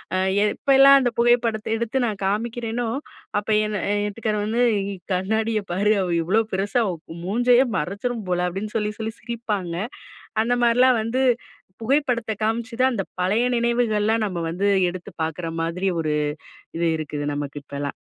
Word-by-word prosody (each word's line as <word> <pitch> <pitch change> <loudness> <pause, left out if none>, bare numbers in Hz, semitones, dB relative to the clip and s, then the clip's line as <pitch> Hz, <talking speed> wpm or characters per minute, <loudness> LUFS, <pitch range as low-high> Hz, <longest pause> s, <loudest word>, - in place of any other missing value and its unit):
அ - - +2 0.3
எப்பலாம் 275 +5 +6
அந்த 250 -2 +2
புகைப்படத்த 235 -2 +2
எடுத்து 235 +3 -2
நான் 210 -4 -3
காமிக்கிறேனோ 230 +3 -1 0.5
அப்ப 205 - -11 0.2
என்ன 210 -1 -2
என் 205 0 0
வீட்டுக்காரு 210 +1 -2
வந்து 230 +3 0 0.5
"கண்ணாடிய 215 +4 0
பாரு 205 +4 +2
அவ 185 - -1
இவ்வளோ 195 +7 +2
பெருசா, 200 +5 0
அவ 185 - -1 0.3
மூஞ்சையே 245 +6 +4
மறைச்சுரும் 200 +7 -3
போல" 180 0 +1
அப்படின்னு 200 +4 -5
சொல்லி 210 -1 -1
சொல்லி 220 0 -3
சிரிப்பாங்க. 210 -7 -3 0.7
அந்த 245 +2 +1
மாதிரிலாம் 245 +1 +5
வந்து 245 +4 0 0.6
புகைப்படத்த 250 -3 +1
காமிச்சுதான், 235 +3 0
அந்த 195 -5 -2
பழைய 205 +6 +2
நினைவுகள்லா 230 -2 +2
நம்ம 185 -4 -4
வந்து 190 +4 0 0.2
எடுத்து 185 +2 -9
பார்க்குற 165 +1 -4
மாதிரி 180 +4 -1
ஒரு 155 -2 -1 0.6
இது 170 0 +2
இருக்குது 145 -1 -4
நமக்கு 145 0 -5
இப்பலாம். 140 +1 -4
215 Hz, 145 wpm, -23 LUFS, 185-235 Hz, 0.7 s, எப்பலாம்